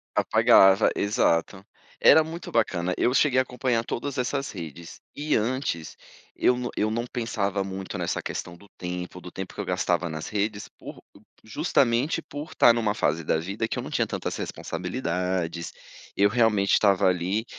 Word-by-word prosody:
Apagava, 95 +2 +5
exato. 95 -1 0 0.3
Era 160 - +7
muito 165 +2 -8
bacana, 90 -6 0
eu 125 - +2
cheguei 135 -1 +3
a - - +4
acompanhar 125 -2 -1
todas 140 +4 -4
essas 135 +2 -1
redes, 85 -2 -9 0.2
e 150 +1 0
antes, 110 - -2 0.4
eu 125 - +2
não 125 -1 -3
eu 105 - +1
não 115 +2 -2
pensava 105 -5 -2
muito 95 0 -6
nessa - - -2
questão 85 -1 -5
do 100 - -18
tempo, 90 0 -6
do 90 - -10
tempo 95 +1 -7
que - - -5
eu - - -5
gastava 90 -1 0
nas 80 -1 -5
redes 105 0 -2
por - - -12 0.4
justamente, 125 +3 +1
por 150 -1 -8
estar 120 - +6
em - - 0
uma 105 -2 0
fase 80 -7 0
da 80 - +1
vida 100 +7 -3
que - - -4
eu - - -3
não - - -8
tinha - - +1
tantas - - -4
responsabilidades, 90 -4 -3 0.5
eu 100 - +5
realmente 105 -4 +2
estava 100 -2 +4
ali, 95 +5 0
100 Hz, 170 wpm, -25 LUFS, 90-120 Hz, 0.5 s, Era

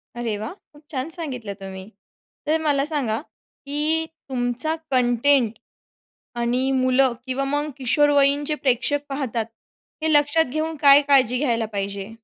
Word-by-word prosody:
अरे 230 -3 -2
वाह! 220 +2 -5
खूप 300 -6 -22
छान 265 +2 -3
सांगितलं 260 - -5
तुम्ही. 190 0 -8 0.6
तर 315 +2 +2
मला 285 -3 +2
सांगा, 265 -8 -1
की 305 +1 -3 0.2
तुमचा 250 +5 -1 0.2
कंटेंट 250 0 +3 0.9
आणि 250 +3 +1
मुलं 255 0 +3
किंवा 260 +1 -1
मग 290 +2 -1
किशोरवयींचे 285 +2 +3
प्रेक्षक 280 +1 0
पाहतात, 255 -5 -2 0.6
हे 315 0 +1
लक्षात 295 +2 +4
घेऊन 315 +1 -2
काय 280 0 +8
काळजी 255 -3 +4
घ्यायला 235 -5 0
पाहिजे? 200 +1 -4
275 Hz, 130 wpm, -23 LUFS, 240-295 Hz, 0.9 s, काय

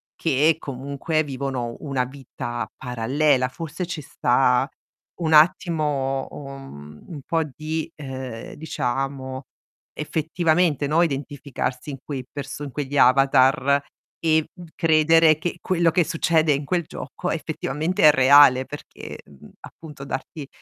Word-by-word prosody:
che 155 0 +2
comunque 140 +4 -2
vivono 130 -4 -4
una 135 -4 -1
vita 125 -2 -6
parallela. 130 +2 +1
Forse 165 +5 -5
ci 170 -3 -5
sta 125 -1 +2 0.5
un 160 -1 +1
attimo 150 -5 +2
un 135 - -10
un 155 -5 -8
po' 165 -1 +1
di, 155 +3 -5
ehm, 130 -5 -7
diciamo 135 -2 -3 0.5
effettivamente 160 0 0
no, 155 +4 +3
identificarsi 140 -3 -4
in 135 - -6
quei 135 -3 -5
perso 145 0 -7
in 140 - -6
quegli 145 +1 -3
avatar 135 +1 +4 0.4
e, 160 -1 +2
uhm, 180 -2 -11
credere 160 -1 +4
che 175 +2 -3
quello 170 -2 +2
che 175 - +3
succede 160 -1 +2
in 140 +1 -2
quel 175 +4 0
gioco - - -6
effettivamente 155 +6 -2
è 155 - +9
reale 135 -1 +6
perché, 145 - -9
mhmm, 70 -2 -16
appunto 150 -4 -11
darti, 140 +2 -6
145 Hz, 125 wpm, -23 LUFS, 130-160 Hz, 0.5 s, è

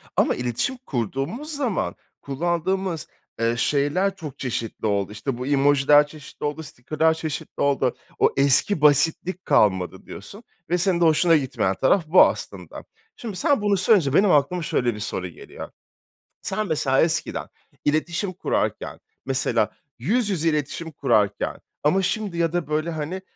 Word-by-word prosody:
ama - - +2
iletişim 125 - -2
kurduğumuz 150 - -4
zaman 255 -8 -1 0.3
kullandığımız, 170 +3 -2 0.3
eee, 115 0 +1
şeyler 150 +10 +1
çok 155 -8 -9
çeşitli 115 -4 -4
oldu. 100 0 0
İşte, 120 +4 -4
bu 125 - -5
emojiler 145 +1 +4
çeşitli 145 -1 -12
oldu, 150 +2 -3
sticker'lar 155 +4 0
çeşitli 160 -2 -5
oldu. 135 -3 +1 0.2
O - - +5
eski 140 +6 +3
basitlik 160 +5 +2
kalmadı 95 -8 +2
diyorsun 205 +4 -10 0.3
ve 175 - +2
senin 180 -1 +1
de - - +5
hoşuna 165 +1 +4
gitmeyen 130 -8 -1
taraf 150 - +2
bu, 175 +4 +7
aslında. - - -5 0.3
Şimdi 225 - -7
sen 285 - +1
bunu 205 -1 +2
söyleyince 180 - +3
benim 195 +4 +4
aklıma 150 +5 +2
şöyle 120 -6 0
bir 105 - -8
soru 95 -3 -3
geliyor. 85 - -10 0.7
Sen, 215 +2 -2
mesela, 135 -5 +2
eskiden 165 0 -1 0.4
iletişim 170 +6 0
kurarken, 185 - -2 0.3
mesela, 130 -5 +1 0.3
yüz 210 - +1
yüze 165 -4 +1
iletişim 150 +2 -3
kurarken 110 -8 0 0.3
ama 175 +7 +3
şimdi 190 -1 -2
ya 165 -1 +1
da, 175 -4 -1
böyle, 155 +2 -1
hani, 160 +4 -4
155 Hz, 145 wpm, -23 LUFS, 135-185 Hz, 0.7 s, bu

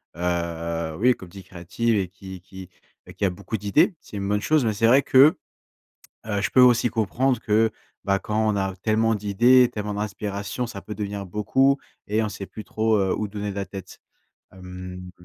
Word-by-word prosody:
heu 85 -2 -2
oui 125 +5 +4
comme 95 - -12
dit, 95 +1 -11
créatives 95 +6 -2
et 95 -2 0
qui 95 +1 -11
et 90 - -10
qui 95 +1 -12 0.4
et - - -12
qui - - -1
a - - +3
beaucoup 100 +4 -5
d'idées. 150 - +2
C'est 105 - -10
une 100 - -3
bonne 105 0 +1
chose, 155 +3 +2
mais 110 - +1
c'est 115 +3 +2
vrai 135 +4 +6
que, 135 +4 +5 0.9
heu, 105 -2 -1
je 100 - -1
peux 130 - +5
aussi 125 -1 +5
comprendre 120 +4 0
que 110 +1 +2 0.3
bah, 100 0 +2
quand 110 +2 -1
on 105 - +1
a 95 -1 -2
tellement 110 +3 +1
d'idées, 120 +5 +4
tellement 105 -2 -4
d'inspiration, 105 +2 -4
ça 100 -4 -8
peut 105 - -7
devenir 100 -2 -5
beaucoup 130 +8 +2 0.3
et 110 +2 0
on 110 - -1
sait 100 -1 -7
plus 110 - -10
trop, 110 0 +1
heu, 95 -1 +1
où 105 - -3
donner 105 0 -4
la 100 0 -3
tête. 95 0 -10 0.5
Hem 90 0 -9
105 Hz, 200 wpm, -24 LUFS, 95-110 Hz, 0.9 s, vrai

